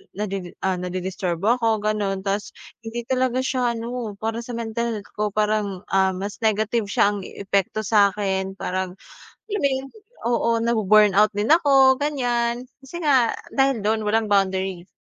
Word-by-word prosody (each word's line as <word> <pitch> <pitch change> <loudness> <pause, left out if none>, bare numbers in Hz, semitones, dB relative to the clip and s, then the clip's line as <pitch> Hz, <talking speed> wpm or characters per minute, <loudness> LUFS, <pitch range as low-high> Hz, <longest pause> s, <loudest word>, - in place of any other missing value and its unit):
nadi 195 -3 -4
ah, 190 -1 +1
nadi-disturbo 185 +3 -1
ako, 225 -2 +2
gano'n, 205 -2 0
tapos 200 +1 -2 0.3
hindi 230 +1 -5
talaga 255 -1 +1
siya 255 -2 0
ano, 235 -1 -4
para 225 +1 -2
sa 245 - -8
mental 235 +1 -2
health 205 - -10
ko 210 - -1
parang, 210 -2 -1
ah, 190 0 +3
mas 200 +2 -5
negative 220 +1 +1
siya 205 0 +3
ang 200 - -5
epekto 200 +1 -1
sa'kin. 195 -2 +1
Parang, 185 0 -3 0.5
alam 410 - -1
mo 280 - +4
'yun, 265 0 -2 0.4
oo, 235 -1 +1
na-bu-burn 215 -3 +4
out 210 +1 +6
din 205 +4 -1
ako, 275 -5 +5
ganiyan. 245 -4 0 0.2
Kasi 345 +6 -8
nga 260 -5 +4 0.2
dahil 270 -5 +2
do'n 220 +1 +1
walang 220 +1 +2
boundary. 190 -2 0
215 Hz, 155 wpm, -23 LUFS, 195-240 Hz, 0.5 s, out